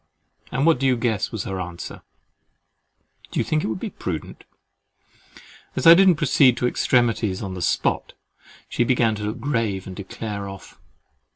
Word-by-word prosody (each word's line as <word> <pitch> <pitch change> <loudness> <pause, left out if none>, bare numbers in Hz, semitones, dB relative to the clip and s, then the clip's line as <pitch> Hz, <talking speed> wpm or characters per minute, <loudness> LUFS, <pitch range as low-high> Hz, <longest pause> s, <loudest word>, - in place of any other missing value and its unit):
And 135 +3 0
what 165 -5 +4
do 135 - +1
you 130 -2 +2
guess 115 -4 -1
was 110 -3 -4
her 95 -1 -4
answer—"Do 85 -1 -12
you - - +2
think 155 0 0
it - - -1
would 110 -3 -3
be - - -5
prudent?" - - -6 1.3
As 130 - -2
I 165 - +11
didn't 185 0 +6
proceed 135 -4 +4
to - - -1
extremities 115 -6 +1
on 95 -2 -5
the 90 - -6
spot, - - 0 0.5
she - - 0
began 120 -2 +2
to 105 0 -5
look 105 - -4
grave, 115 -9 -1
and 95 - -8
declare 100 +1 -6
off. 95 -1 -12
115 Hz, 165 wpm, -23 LUFS, 100-130 Hz, 1.3 s, I